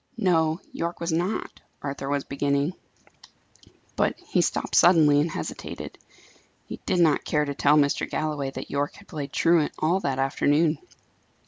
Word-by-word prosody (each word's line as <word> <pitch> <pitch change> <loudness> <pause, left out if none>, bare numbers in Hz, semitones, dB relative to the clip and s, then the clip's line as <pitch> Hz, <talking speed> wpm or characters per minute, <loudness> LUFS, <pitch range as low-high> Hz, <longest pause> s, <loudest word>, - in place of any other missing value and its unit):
"No, 165 -5 +2
Yorke 170 +1 -3
was 170 0 -2
not," 180 +6 -2 0.2
Arthur 140 -1 -4
was 140 -1 0
beginning. 140 +3 -1 1.2
But - - +1
he - - 0
stopped - - -2
suddenly 155 -5 +6
and 160 - 0
hesitated. - - -6 0.7
He - - -8
did - - +1
not 160 -4 +3
care 150 -1 0
to 140 - -3
tell 145 +2 +3
Mr. 145 -1 +1
Galloway 150 -3 -2
that 135 - -8
Yorke 145 +2 -1
had 205 - -16
played 145 -4 -6
truant 165 -2 +2
all 170 +5 +1
that 135 -7 -2
afternoon. 145 +4 +2
150 Hz, 150 wpm, -25 LUFS, 140-170 Hz, 1.2 s, suddenly